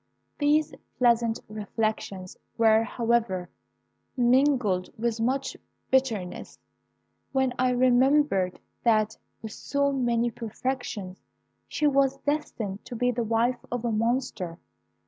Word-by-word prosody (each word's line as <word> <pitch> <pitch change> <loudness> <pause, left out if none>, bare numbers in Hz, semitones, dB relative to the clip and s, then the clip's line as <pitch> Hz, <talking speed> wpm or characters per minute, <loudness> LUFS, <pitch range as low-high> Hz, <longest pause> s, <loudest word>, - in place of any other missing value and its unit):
These 300 +1 +2 0.2
pleasant 235 -2 +3
reflections 215 -3 -3 0.2
were, 220 -1 +5
however, 225 -6 0 0.7
mingled 245 -7 +3
with 230 0 -1
much 265 +3 0 0.4
bitterness, 230 -9 0 0.8
when 265 -2 +2
I 255 0 +3
remembered 250 -5 +3 0.2
that, 215 -2 +2 0.3
with 220 - -6
so 280 0 0
many 240 -3 +1
perfections, 225 -4 -4 0.5
she 300 - -1
was 275 -2 +3
destined 245 -9 -3
to 245 - -7
be 245 +2 +1
the 240 0 -2
wife 230 +3 0
of 245 -1 -2
a 235 - +1
monster. 220 -6 -1
235 Hz, 105 wpm, -27 LUFS, 220-260 Hz, 0.8 s, were